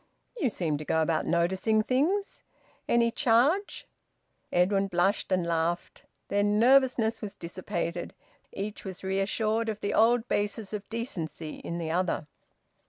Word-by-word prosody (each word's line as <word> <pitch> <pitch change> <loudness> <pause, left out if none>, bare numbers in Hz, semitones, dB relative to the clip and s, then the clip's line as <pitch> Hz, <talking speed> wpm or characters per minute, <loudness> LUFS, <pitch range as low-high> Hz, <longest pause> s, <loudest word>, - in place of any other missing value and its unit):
"You 330 - +1
seem 160 -8 -2
to - - -5
go 160 +1 +1
about 160 0 0
noticing 190 +6 +2
things. 325 - 0 0.5
Any 235 0 +3
charge?" 280 - +2 0.7
Edwin 195 +2 +2
blushed 190 +2 +1
and 185 -2 +2
laughed. 170 +1 -2 0.2
Their 205 - +2
nervousness 230 +2 +3
was 210 -3 -6
dissipated. 170 0 -4 0.4
Each 205 +2 -5
was 190 -2 -7
reassured 215 +4 0
of 215 -1 -3
the 200 - -2
old 235 +1 +4
basis 205 0 -2
of 210 -1 -5
`decency' 170 -9 -5
in 170 - -4
the 165 -2 -3
other. 175 -2 0
205 Hz, 135 wpm, -28 LUFS, 175-230 Hz, 0.7 s, old